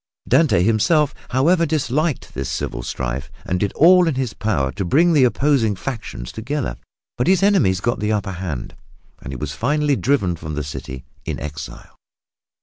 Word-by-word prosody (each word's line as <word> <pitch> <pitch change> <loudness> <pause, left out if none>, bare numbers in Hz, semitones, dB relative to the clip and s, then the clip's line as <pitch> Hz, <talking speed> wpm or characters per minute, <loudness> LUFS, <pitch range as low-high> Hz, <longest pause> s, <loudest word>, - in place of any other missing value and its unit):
Dante 105 - +4
himself, 130 - +3 0.2
however, 165 +7 +3
disliked 150 0 -1
this 65 +1 -4
civil - - -3
strife 65 +3 -4 0.2
and 90 - -1
did 100 0 0
all 180 +2 +6
in 160 - 0
his 130 -5 -2
power 70 -12 -1
to 95 - -4
bring 165 - +3
the 145 -4 +5
opposing 125 -4 +2
factions 105 - -6
together. 120 - -3 0.4
But 125 - +1
his 190 0 +4
enemies 170 - +3
got 120 +2 0
the 105 +1 0
upper 100 -3 -1
hand, 85 -8 -5 0.5
and 65 - -7
he 65 - -5
was 70 +2 -4
finally 145 - +1
driven 125 -11 +1
from 80 -2 -6
the 75 - -2
city 65 -2 -7 0.2
in - - -4
exile. 70 -4 -8
110 Hz, 170 wpm, -20 LUFS, -, 0.5 s, all